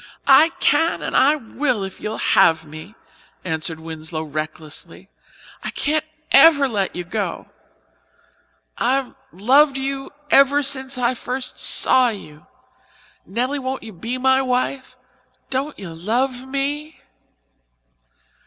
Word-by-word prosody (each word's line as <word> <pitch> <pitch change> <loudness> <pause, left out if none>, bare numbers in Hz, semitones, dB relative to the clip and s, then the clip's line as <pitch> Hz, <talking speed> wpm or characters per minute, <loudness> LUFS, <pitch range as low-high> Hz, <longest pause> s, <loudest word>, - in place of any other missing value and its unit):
"I 280 +4 +6
can 325 +4 +2
and - - -4
I 285 +3 +5
will, 250 -3 -2
if 195 -1 -8
you'll 215 +1 -4
have 160 0 +3
me," 155 +8 -11 0.5
answered 160 -1 -2
Winslow 160 0 -6
recklessly. 155 0 -7 0.5
"I - - -3
can't 310 +1 -1 0.3
ever 280 -1 +7
let 200 -6 -2
you 180 - -4
go. 200 +4 -4 1.3
I've 260 +2 0 0.2
loved 270 +8 +3
you 270 0 -4 0.2
ever 275 +1 +5
since 270 -1 +2
I 245 0 +1
first 255 +1 -4
saw 255 -1 +4
you. 155 -9 -10 0.8
Nelly, 250 +8 -2
won't 260 0 -4
you 220 - -10
be 230 +9 -4
my 265 +1 +3
wife? 255 +1 -2 0.5
Don't 275 +3 -2
you 190 - -8
love 245 +9 -2
me?" 290 +3 -3
255 Hz, 120 wpm, -20 LUFS, 190-275 Hz, 1.3 s, ever